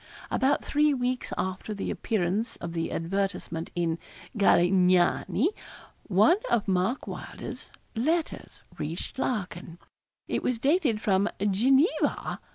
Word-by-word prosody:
About 270 +2 +2
three 295 0 +3
weeks 250 0 -2
after 190 +3 -3
the 200 - -3
appearance 210 +1 -1
of 170 -1 -6
the 165 -1 -2
advertisement 175 -2 -2
in 170 -1 0 0.4
'Galignani,' 185 - +3 0.6
one 215 - +5
of 235 -3 +1
Mark 190 +7 0
Wylder's - - -7 0.3
letters 315 +8 -1 0.2
reached 165 - -4
Larkin. 180 -8 -3 0.5
It - - -1
was 250 - 0
dated 275 - +2
from 200 0 +2
Geneva 250 - +2
200 Hz, 110 wpm, -27 LUFS, 180-255 Hz, 0.6 s, one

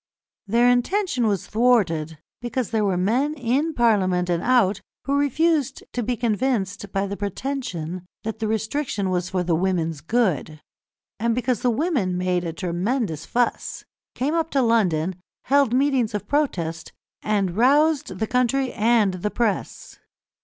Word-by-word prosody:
Their 235 +4 +3
intention 250 - +1
was 200 -4 0
thwarted, 190 -10 +1 0.2
because 240 -1 -3
there 220 -2 +1
were 195 -3 +1
men 250 +11 +1
in 280 +4 0
Parliament 185 -6 +2
and 170 -1 0
out 220 -6 +2 0.2
who 275 - 0
refused 290 0 +1
to 245 - -1
be 240 +1 -2
convinced 215 -4 -1
by 195 0 0
the 200 0 -4
pretension 195 - -4 0.2
that 220 0 -4
the 220 - -1
restriction 220 -2 -1
was 180 0 -1
for 185 -2 -1
the 175 -1 0
women's 165 -3 0
good, 165 - 0 0.6
and 230 +1 +1
because 250 -2 0
the 250 - +2
women 240 - 0
made 180 -1 0
a 165 - -2
tremendous 175 - -2
fuss, 245 0 -1 0.3
came 275 +5 -1
up 325 -1 0
to 275 -4 +1
London, 185 -6 +1 0.2
held 280 -3 +3
meetings 255 -4 +1
of 205 0 -4
protest, 175 - -1 0.3
and 200 -4 0
roused 285 - +3
the 220 - 0
country 250 +2 +1
and 220 -3 +3
the 210 - 0
press. 220 -2 -3
220 Hz, 150 wpm, -23 LUFS, 185-255 Hz, 0.6 s, Their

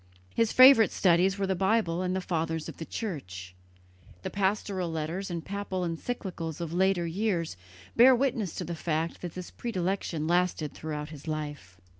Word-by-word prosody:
His 230 -1 +2
favourite 255 -3 +8
studies 185 +2 +3
were 200 - 0
the 190 - +1
Bible 190 -2 +1
and 185 0 -1
the 190 - -1
Fathers 165 -2 -2
of - - -8
the 160 - -7
Church. 95 - -6 0.7
The - - -4
pastoral 195 -2 -1
letters 160 +5 -3
and 170 -2 -4
papal 200 -2 -3
encyclicals 170 -2 -4
of 170 -1 -4
later 185 -1 +2
years 170 - -1 0.4
bear 255 +2 +8
witness 240 -7 -1
to - - -3
the 170 - -4
fact 165 0 -2
that 175 -2 -6
this 180 -1 -7
predilection 185 -7 -2
lasted 175 -3 +1
throughout 150 -1 -5
his 150 0 -11
life. 145 -12 -5
175 Hz, 165 wpm, -28 LUFS, 160-195 Hz, 0.7 s, favourite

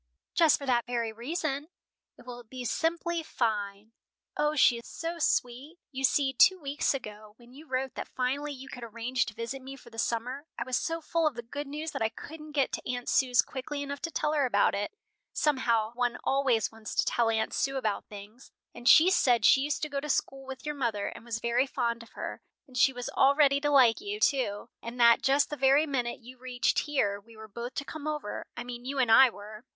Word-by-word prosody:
"Just 325 -3 +5
for 280 - -7
that 240 -3 +1
very 235 -2 -1
reason. 285 +4 -3 0.5
It - - -16
will 245 -1 -8
be 250 +2 -8
simply 335 +4 -1
fine. 215 -6 -2 0.4
O, 300 0 +1
she 245 -4 +5
is 235 - -13
so 335 +1 -5
sweet! 270 +3 -1
You 265 -1 -5
see, 270 0 +3
two 375 +8 +5
weeks 285 -1 0
ago, 215 -4 -9
when 240 0 -18
you 305 +4 -13
wrote 260 0 -2
that - - -6
finally 275 +4 -2
you 270 -1 -9
could 250 -3 -9
arrange 235 +2 -2
to 220 - -7
visit 235 +4 -5
me 265 +1 -8
for 240 -3 -16
the 225 - -8
summer, 250 +7 -2
I - - -2
was 255 -1 -2
so 330 +7 -1
full 330 0 +1
of 295 - -2
the 240 - -6
good 285 +5 -6
news 305 +3 -5
that - - -5
I 220 - +2
couldn't 305 +6 -10
get 280 -2 +1
to - - -4
Aunt 245 -1 -4
Sue's 250 -3 +4
quickly 285 +2 -5
enough 280 0 -6
to 330 - -3
tell 300 -2 -1
her 285 -3 +2
about 205 -4 +3
it, 200 +1 -2 0.4
somehow 235 -6 +1
one 245 0 -1
always 265 -5 +1
wants 220 -1 -8
to - - +2
tell 235 -1 +2
Aunt 220 -1 0
Sue 275 0 0
about 215 -6 -2
things, 210 +5 -12 0.2
and 240 +1 0
she 345 +4 +8
said 240 - +3
she 265 - +6
used 295 +2 -2
to - - 0
go 280 -1 -2
to 300 +2 -6
school 270 -1 -1
with 265 +1 -8
your 300 - -2
mother, 235 -8 -1
and - - -11
was 230 -1 -4
very 240 +3 +1
fond 235 -3 -1
of 230 - -15
her, - - -6 0.2
and 260 - -17
she 250 +2 +5
was 245 -1 -6
all 275 +1 +4
ready 280 -2 +4
to 290 - +1
like 260 -1 +5
you, 410 +1 -4
too, 250 - +1
and 235 +2 -7
that 235 -1 +6
just 280 +2 +2
the - - -2
very 275 +3 +4
minute 250 -5 -2
you 250 +2 -13
reached 250 -1 0
here, 205 -9 0
we 225 +2 -18
were 220 0 -10
both 235 +4 -7
to 280 - -3
come 305 0 -7
over 300 -8 -4
I 240 - -4
mean 245 0 -7
you 275 +2 -4
and 250 -4 +2
I 265 +3 +8
were." 215 0 -11
255 Hz, 230 wpm, -29 LUFS, 235-285 Hz, 0.5 s, she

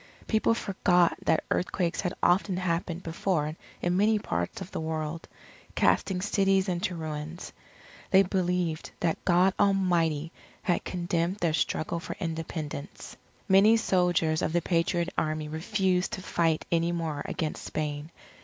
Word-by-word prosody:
People 220 +1 +2
forgot 180 -5 +2
that 160 - +2
earthquakes 180 -1 0
had 180 -2 -2
often 185 +1 +3
happened 170 -1 -2
before 165 -2 -1 0.3
in 175 0 +1
many 215 +2 +4
parts 85 - -3
of 190 -1 -8
the - - -4
world, 160 0 -3 0.5
casting 185 -2 +2
cities 195 -1 +2
into 180 +1 -1
ruins. 155 +1 -6 0.6
They 195 -1 +6
believed 180 -4 -1
that 165 -2 0
God 185 +1 +4
Almighty 175 -6 +2 0.3
had 180 -4 +1
condemned 175 0 -1
their 170 -5 0
struggle 165 +1 -1
for - - -6
Independence. 160 -4 -5 0.3
Many 205 +4 +6
soldiers 175 -6 +2
of 160 - -1
the 175 - +2
Patriot 170 0 +1
Army 155 0 -2
refused 180 +3 0
to 190 - -4
fight 165 -4 +1
any 170 0 +2
more 160 -4 -2
against 155 -2 -3
Spain. 150 0 -3
175 Hz, 135 wpm, -28 LUFS, 160-190 Hz, 0.6 s, They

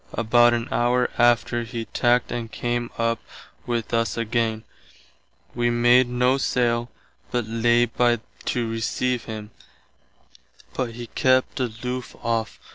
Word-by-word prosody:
About 120 +1 +4
an 120 +1 -3
hour 125 0 +2
after 120 0 +3
he 115 -1 -5
tackt 120 +1 +1
and 115 -2 -4
came 120 0 -2
up 115 -1 0 0.5
with 120 -1 -2
us 115 -2 0
againe. 115 -1 -1 0.9
Wee 120 0 +1
made 120 +1 +4
noe 125 +2 +2
saile, 120 -2 0 0.4
but 120 -2 -1
lay 120 +2 +3
by 120 0 +1 0.3
to 120 -2 -1
receive 115 +2 -1
him, 110 -1 -7 1.2
but 125 -3 -3
he 120 0 -6
kept 130 +2 +1
aloof 125 +1 -4
off. 115 -1 -1
120 Hz, 125 wpm, -24 LUFS, 115-120 Hz, 1.2 s, About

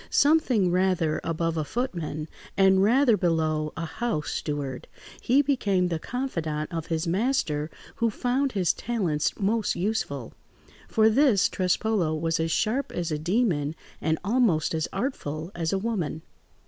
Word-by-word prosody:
Something 265 - +3
rather 180 -4 +1
above 165 0 -1
a 155 - 0
footman 165 - -3 0.3
and 190 -1 +5
rather 240 +3 +4
below 160 -4 0
a 165 - -2
house 165 -1 -2
steward, 140 -4 -4 0.3
he 270 +4 +3
became 200 -10 +1
the 165 -2 -2
confidant 165 - -3
of 165 -1 -3
his 165 0 -1
master, 170 - 0 0.3
who 230 0 +2
found 255 +5 0
his 185 -4 +2
talents 180 -11 -1
most 215 +2 +1
useful; 170 - -2 0.5
for 220 0 +4
this 230 -3 +4
Trespolo 185 -2 0
was 165 0 0
as 160 0 0
sharp 250 - 0
as 170 -2 -3
a 150 - -1
demon 165 -4 0 0.3
and 160 0 +1
almost 205 -9 +2
as 160 0 -1
artful 175 - -3
as 165 -2 -2
a 195 - +1
woman. 190 -8 -2
180 Hz, 145 wpm, -26 LUFS, 160-230 Hz, 0.5 s, and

